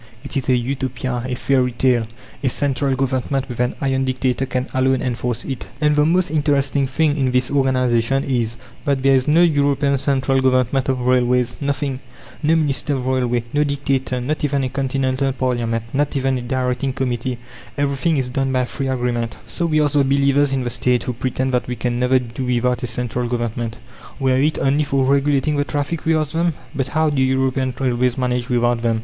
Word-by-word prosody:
It 140 - -7
is 135 -1 -1
a 130 - +5
Utopia, 130 0 -2
a 125 - -2
fairy 125 -1 +1
tale. 120 -2 +2 0.4
A 130 - +2
central 140 0 0
Government, 130 0 -1
with 120 -2 -7
an 125 0 0
'iron' 135 -1 +1
dictator, 130 0 -1
can 130 0 -1
alone 130 0 +2
enforce 125 -1 -2
it." 135 -3 -5
And 150 -1 +3
the 150 +1 +3
most 180 -1 +2
interesting 140 -2 +1
thing 145 +2 +1
in 135 -2 +1
this 125 0 +1
organization 130 -1 +2
is, 120 -3 -1 0.3
that 140 -3 0
there 135 0 +5
is 130 0 +2
no 160 +4 +5
European 140 -3 +2
Central 135 -1 +1
Government 130 +1 +2
of 130 -1 0
Railways! 125 -1 +2
Nothing! 140 -1 -2 0.4
No 160 +1 +3
minister 145 -2 0
of 130 -2 -3
railways, 125 -2 0
no 145 0 +3
dictator, 135 -3 -1
not 150 +6 -3
even 140 -2 +1
a 130 - -1
continental 135 0 0
parliament, 120 -3 -1
not 145 +1 0
even 135 -1 0
a - - -6
directing 125 +1 -1
committee! 125 -1 -2 0.4
Everything 145 +3 +1
is 130 -2 0
done 135 +1 -1
by 130 -1 +1
free 135 +2 -4
agreement. 120 -3 -2
So 170 - -2
we 155 -1 +2
ask 145 -1 0
the 145 -1 +4
believers 140 +1 +3
in 135 -1 0
the 120 - -2
State, 125 +1 +1
who 125 - -3
pretend 130 +2 -2
that 125 - 0
"we 125 - -3
can 120 +1 -2
never 125 +1 +3
do 125 0 -4
without 125 0 0
a 125 - -2
central 120 +1 -2
Government, 120 -1 -3 0.4
were 130 -1 +2
it 155 +2 +1
only 140 +2 +2
for 135 -2 +1
regulating 140 +2 +2
the 145 - +2
traffic," 145 +3 -3
we 160 0 +3
ask 155 -2 -1
them: 170 0 +1 0.2
"But 135 -2 -1
how 155 +3 +1
do 140 -2 0
European 130 -1 +1
railways 125 -1 +1
manage 125 -1 -1
without 120 -1 +1
them? 115 -1 +1
130 Hz, 200 wpm, -20 LUFS, 125-140 Hz, 0.4 s, a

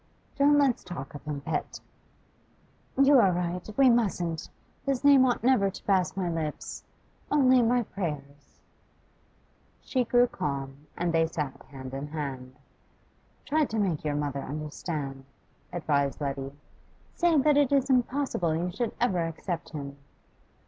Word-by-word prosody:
'Don't 285 +1 +5
let 280 -2 +5
us - - -22
talk 140 -7 -7
of 145 - -9
him, 145 -2 -4
pet.' 155 +2 -3 1.2
'You 275 0 +7
are 195 -5 +5
right; 180 +2 -3
we 270 -1 +6
mustn't. 185 -9 +1 0.3
His 275 -2 -1
name 280 -2 +7
ought 245 - 0
never 240 -6 +4
to 195 - -10
pass 190 -3 +1
my 185 -2 0
lips, 160 -3 -4 0.5
only 260 -3 +5
in 235 - +3
my 245 +1 +2
prayers.' 145 -8 -7 1.2
She 255 -2 0
grew 245 +1 +4
calmer, 140 - -4 0.2
and 175 -1 0
they 165 0 +3
sat 145 -4 -4
hand 130 -1 -9
in 135 +2 -4
hand. 135 -4 -5 0.9
'Try 310 +1 +2
to 225 - -4
make 185 -8 0
your 150 -1 -1
mother 145 -1 -2
understand,' 145 -2 -5 0.5
advised 145 -5 0
Letty. 135 -2 -3 0.6
'Say 345 -2 +3
that 295 +1 +4
it 285 -2 +3
is 275 -2 +3
impossible 250 - +1
you 175 +2 -1
should 235 +4 -3
ever 185 -9 +1
accept 165 +2 -5
him. 140 -3 -7
175 Hz, 150 wpm, -28 LUFS, -, 1.2 s, You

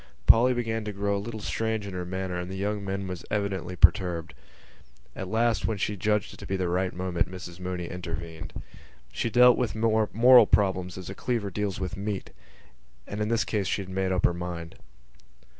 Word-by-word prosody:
Polly 125 +2 +6
began 115 -2 -2
to 105 - -3
grow 100 0 -1
a 100 - -2
little 110 0 -6
strange 110 0 -2
in 100 - -6
her 90 -1 -4
manner 95 -1 -3
and 90 0 -5
the 95 - -5
young 100 +1 -2
man 95 0 -3
was 90 -2 -6
evidently 100 -3 -2
perturbed. 90 -3 +3 0.8
At 95 - -5
last, 115 +3 +1
when 110 - -1
she 105 +1 -1
judged 105 +1 0
it - - -12
to - - -9
be 95 - -1
the 90 -2 -1
right 90 +1 0
moment, 90 -1 -1
Mrs 90 -1 -9
Mooney 90 -1 -4
intervened. 85 -2 -6 0.6
She 115 - -2
dealt 125 +1 +6
with 120 -4 -1
moral 115 +3 +5
problems 95 -3 +1
as 95 0 -7
a - - -5
cleaver 110 -2 -2
deals 100 0 -2
with 95 -1 -4
meat: 100 -1 -4 0.7
and 105 +1 -5
in 105 - 0
this 115 0 +2
case 105 -4 -1
she 100 - -1
had 95 - -12
made 95 0 -1
up 95 0 +2
her - - +3
mind. 85 -1 -5
95 Hz, 200 wpm, -27 LUFS, 90-105 Hz, 0.8 s, Polly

